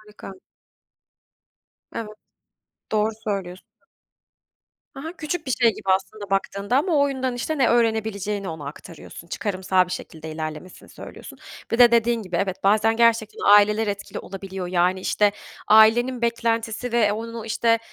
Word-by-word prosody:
Harika. 210 -2 -12 1.6
Evet, 215 -2 -6 0.8
doğru 215 +1 +2
söylüyorsun. 190 -3 -4 1.3
Ha 275 +2 -9
ha, 325 - -5
küçük 310 0 -4
bir - - -3
şey 235 -2 +3
gibi - - -10
aslında 190 +2 -1
baktığında 200 +3 -1
ama 330 +6 +1
o - - +4
oyundan, 260 -2 -2
işte, 295 +5 -3
ne 255 - +4
öğrenebileceğini 220 -4 0
ona 160 -3 -7
aktarıyorsun, 165 +3 -11
çıkarımsal 185 -2 0
bir - - -12
şekilde 160 0 -7
ilerlemesini 155 +3 -7
söylüyorsun. - - -11 0.3
Bir 230 - -1
de 240 -1 +8
dediğin 235 -1 +2
gibi, 180 -3 -4
evet, 190 0 -2
bazen 215 +2 +3
gerçekten 230 -2 +2
aileler 210 +1 +5
etkili 200 -1 -5
olabiliyor. 190 -1 -7
Yani, 180 +1 +1
işte, 205 +2 +2 0.4
ailenin 235 +3 +5
beklentisi 230 0 -1
ve 215 -3 +3
onun 230 +2 -6
o, 225 -2 -6
işte, 230 +1 +1
215 Hz, 145 wpm, -23 LUFS, 190-235 Hz, 1.6 s, de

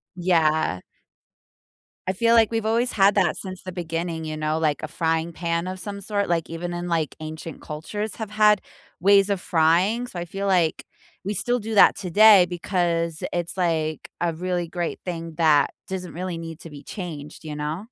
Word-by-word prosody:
Yeah. 160 - +2 1.3
I 185 - +1
feel, 230 +4 +3
like, 225 -1 +5
we've 225 -1 -1
always 235 +3 +1
had 200 0 +4
that 185 -5 +2
since 185 -2 -7
the 185 - -6
beginning, 165 -1 -3
you 155 0 -4
know, 155 +1 -1
like, 155 -1 0
a - - -2
frying 165 +1 -1
pan 170 +1 -2
of 185 0 -5
some 200 +1 -6
sort, 200 -1 -1
like, 165 -2 0
even 175 +1 -4
in, 175 0 -4
like, 165 -4 -1
ancient 155 0 -7
cultures 205 +8 -5
have 220 -2 -5
had 210 -1 +4 0.4
ways 200 +1 +5
of 195 -2 0
frying? 180 +9 +2
So, 185 -8 -7
I 175 - -4
feel, 195 +3 -5
like, 180 -5 +1 0.4
we 205 +2 -2
still 245 +4 0
do 220 +1 -5
that 205 - +7
today 200 +1 +6
because 170 -2 -1
it's, 175 +2 -3
like, 160 -3 -1
a 170 -1 +1
really 175 0 -2
great 175 0 -3
thing 165 -2 -5
that 150 -4 +4 0.2
doesn't 185 -2 -5
really 180 0 -4
need 165 0 -7
to 165 - -9
be 145 -1 -11
changed, 160 -6 -7
you 150 -1 -6
know? 150 +6 -3
175 Hz, 190 wpm, -24 LUFS, 160-195 Hz, 1.3 s, that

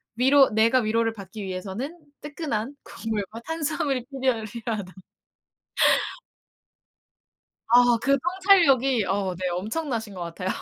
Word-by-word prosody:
위로 265 +3 +5
내가 225 +4 +4
위로를 225 0 +1
받기 200 0 -9
위해서는 195 - -5 0.2
뜨끈한 290 -5 -4
국물과 215 +1 -5
탄수화물이 290 -5 -2
필요하 260 -4 0
필요하다. 215 -4 -5 2.7
아 245 0 +5
그 275 +1 +3
통찰력이 280 - +3
어 190 -1 -1
네 185 +1 -3
엄청나신 220 - -3
것 180 - -8
같아요. 175 +2 -4
230 Hz, 265 characters per minute, -25 LUFS, 205-275 Hz, 2.7 s, 위로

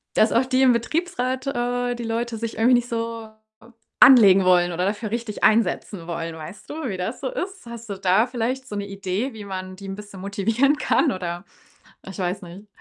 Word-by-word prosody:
dass 215 - +4
auch 245 +3 +3
die 260 0 +1
im 250 -2 +6
Betriebsrat 260 0 -2
äh, 245 -1 -1
die 240 - -6
Leute 230 0 -2
sich 230 0 -4
irgendwie 245 +3 +5
nicht 240 0 0
so 230 -1 -4 0.7
anlegen 200 -8 +8
wollen 175 -1 +4
oder 180 +2 -1
dafür 210 +1 -2
richtig 230 -2 -3
einsetzen 200 -4 +1
wollen. 165 -1 -4
Weißt 160 +5 -10
du, 305 -3 -4
wie 190 - -3
das 185 +7 -4
so 265 - -2
ist? 380 -6 -6
Hast 235 -1 -9
du 200 - -3
da 195 +5 +3
vielleicht 255 +2 -3
so 210 - -6
'ne 200 0 -3
Idee, 195 +5 -3
wie 210 -2 -8
man 185 -1 -6
die 195 0 -10
'n 195 - -4
bisschen 205 -2 -10
motivieren 220 +9 +1
kann, 300 -1 +2
oder 175 0 -5 0.6
ich 195 - -8
weiß 185 +2 -2
nicht. 185 +5 -11
220 Hz, 200 wpm, -23 LUFS, 190-245 Hz, 0.7 s, anlegen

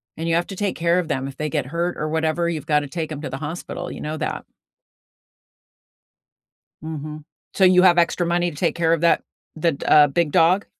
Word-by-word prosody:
and 165 +1 -4
you 165 - +2
have 175 - 0
to 195 - -7
take 200 0 -2
care 170 +2 +2
of 170 -3 -4
them. 135 -2 -2
If 135 - -9
they 155 0 -2
get 150 -5 -1
hurt 170 +4 -2
or 155 - -2
whatever, 160 +2 0
you've 155 -4 -4
gotta 150 -2 +1
take 160 +1 -5
'em 145 0 -5
to 145 - -5
the 135 - -5
hospital, 160 +4 -6
you - - -8
know 155 +1 -4
that? - - -4 2.4
Mhm. 155 -1 -6 0.3
So 195 - +1
you 180 0 +6
have 180 -2 +5
extra 175 +1 +2
money 175 +1 +1
to 150 - -11
take 170 - 0
care 165 -1 +2
of 165 - 0
that, 170 - +3 0.3
the 165 0 +1
d 140 - -8
uh, 150 -1 +6
big 150 +2 0
dog? 180 +7 +3
160 Hz, 220 wpm, -22 LUFS, 150-175 Hz, 2.4 s, you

